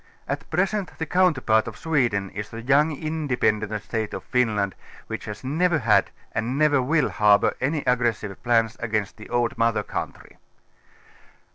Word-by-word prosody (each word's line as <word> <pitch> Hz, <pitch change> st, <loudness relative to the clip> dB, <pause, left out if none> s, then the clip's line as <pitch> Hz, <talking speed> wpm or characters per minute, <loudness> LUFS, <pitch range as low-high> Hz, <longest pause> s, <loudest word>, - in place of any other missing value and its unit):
At 145 Hz, +3 st, -4 dB
present 190 Hz, +3 st, -1 dB
the 160 Hz, -, -2 dB
counterpart 150 Hz, -13 st, +2 dB
of 110 Hz, -1 st, -7 dB
Sweden 120 Hz, -, 0 dB
is 105 Hz, +1 st, -6 dB
the 115 Hz, 0 st, -8 dB
young 145 Hz, +5 st, +4 dB
independent 110 Hz, -9 st, -1 dB
State 110 Hz, -2 st, -3 dB
of -, -, -6 dB
Finland, 105 Hz, -6 st, 0 dB, 0.3 s
which -, -, -6 dB
has 105 Hz, +3 st, -7 dB
never 160 Hz, +5 st, +1 dB
had 115 Hz, -6 st, +3 dB, 0.2 s
and 115 Hz, +4 st, -2 dB
never 145 Hz, -2 st, +4 dB
will 150 Hz, +3 st, +2 dB
harbour 105 Hz, -1 st, +4 dB
any 145 Hz, +3 st, 0 dB
aggressive 120 Hz, -5 st, 0 dB
jjlaus 115 Hz, -2 st, +2 dB
against 110 Hz, -3 st, -2 dB
the 105 Hz, -, -11 dB
old 120 Hz, -1 st, 0 dB
mother 115 Hz, -2 st, +2 dB
country. -, -, -6 dB
120 Hz, 150 wpm, -24 LUFS, 110-150 Hz, 0.3 s, young